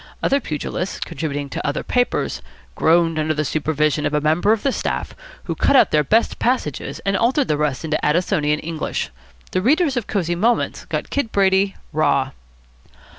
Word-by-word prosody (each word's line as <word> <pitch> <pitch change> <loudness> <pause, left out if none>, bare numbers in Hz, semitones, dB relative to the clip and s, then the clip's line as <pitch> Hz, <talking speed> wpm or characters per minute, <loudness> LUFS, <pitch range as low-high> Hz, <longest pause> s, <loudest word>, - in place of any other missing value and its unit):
Other 275 - +3
pugilists, 175 - -4
contributing 145 -3 -3
to - - -4
other 145 - -1
papers, 245 0 0 0.3
groaned 165 -1 +3
under 155 0 0
the 155 +1 -1
supervision 155 0 0
of 150 - -2
a - - +3
member 160 +7 +2
of 220 -1 +1
the 275 - +2
staff - - -3 0.3
who - - -3
cut - - +2
out 260 - +6
their 150 -1 +3
best 225 - +1
passages 150 - -1
and 195 0 +1
altered 250 +6 +2
the 150 - +1
rest 150 0 -1
into 155 0 -1
Addisonian 150 -2 +1
English. 160 -1 -3 0.4
The 185 - 0
readers 285 - +2
of 235 - -2
Cosy 175 -4 -1
Moments 225 +7 0
got - - -4
Kid 280 -6 -1
Brady 195 0 +2 0.2
raw. 140 -3 +2
165 Hz, 175 wpm, -21 LUFS, 150-220 Hz, 0.4 s, out